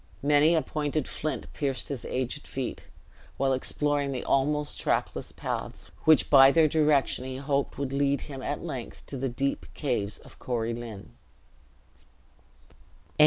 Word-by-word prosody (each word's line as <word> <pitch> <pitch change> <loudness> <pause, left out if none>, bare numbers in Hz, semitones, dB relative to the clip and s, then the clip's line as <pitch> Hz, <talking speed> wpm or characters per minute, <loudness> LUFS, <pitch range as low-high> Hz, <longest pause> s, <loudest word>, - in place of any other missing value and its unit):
Many 150 +3 +5
a 160 - +2
pointed 150 -1 -2
flint 150 -5 -3
pierced 135 -3 -2
his 140 -5 -4
aged 130 +3 -3
feet, 130 -2 -5 0.5
while 135 0 +2
exploring 145 +2 0
the 130 - -3
almost 150 +2 +1
trackless - - -1
paths, - - -5
which 155 -1 +6
by 135 -2 +9
their 160 +1 +5
direction 150 -4 +2
he 130 0 -5
hoped 140 0 -1
would 135 -1 -3
lead 140 0 +2
him 135 -3 -7
at 145 +5 -3
length 130 -8 -6
to - - -8
the 135 +1 -1
deep 135 +3 -2
caves 115 -8 -1
of - - -16
Corie 115 -2 -1
Lynn. 115 -4 -8
140 Hz, 145 wpm, -28 LUFS, 130-150 Hz, 0.5 s, by